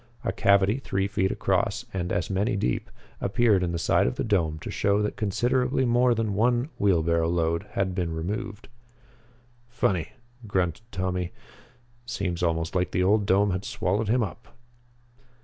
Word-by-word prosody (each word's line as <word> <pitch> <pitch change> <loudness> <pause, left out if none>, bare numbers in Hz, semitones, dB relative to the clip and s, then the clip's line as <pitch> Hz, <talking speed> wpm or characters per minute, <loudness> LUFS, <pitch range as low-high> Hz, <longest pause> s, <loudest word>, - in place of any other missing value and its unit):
A - - 0
cavity 100 +4 +3
three 95 -7 -1
feet 100 -2 0
across, 100 +5 0
and 90 -2 -2
as 90 - -1
many 100 +3 +1
deep, 65 -11 -1 0.3
appeared 105 -1 +3
in 90 -1 -1
the 85 - -2
side 85 - +2
of 60 - -2
the - - -2
dome 80 -6 +1
to - - -6
show 100 0 +1
that 105 - -2
considerably 125 +5 +1
more 120 0 +3
than 110 -2 -1
one 120 +6 +2
wheelbarrow 85 -4 +2
load 85 -1 0
had 95 -1 0
been 90 -3 -2
removed. 105 +7 -4 1.0
"Funny," 95 -8 -1 0.3
grunted 95 +3 -2
Tommy. 90 -1 -2 0.7
"Seems 100 -8 -3
almost 80 -1 0
like 90 -1 +1
the 90 - 0
old 100 +1 +3
dome 100 +1 +3
had 95 +1 -2
swallowed 100 +4 -1
him 120 +1 +3
up." 110 +1 -7
100 Hz, 160 wpm, -26 LUFS, 90-110 Hz, 1.0 s, cavity